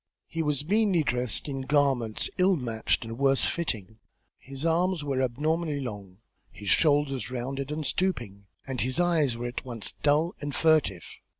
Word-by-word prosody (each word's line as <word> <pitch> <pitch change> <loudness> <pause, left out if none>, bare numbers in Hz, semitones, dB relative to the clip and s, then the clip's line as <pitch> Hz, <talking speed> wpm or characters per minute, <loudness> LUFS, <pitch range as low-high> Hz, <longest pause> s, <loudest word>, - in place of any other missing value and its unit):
He 165 - -3
was 150 -2 -1
meanly 200 -3 +3
dressed 125 -1 0
in 135 -2 -3
garments 135 -5 +1
ill 185 +1 +5
matched 120 -7 -1
and 115 +2 -7
worse 135 -1 +3
fitting; 110 - -3 0.4
his 135 +3 -7
arms 170 0 +1
were 135 -2 -1
abnormally 150 +4 0
long, 100 -8 -7 0.3
his 100 -2 -6
shoulders 145 -6 +2
rounded 135 +2 -4
and 155 0 -3
stooping, 120 - -2 0.2
and 130 -2 -3
his 130 +4 0
eyes 160 -8 +2
were 120 - -4
at 120 0 -4
once 120 -5 -5
dull 150 +4 +2
and 145 -1 -4
furtive. 155 - +2
135 Hz, 160 wpm, -28 LUFS, 120-155 Hz, 0.4 s, ill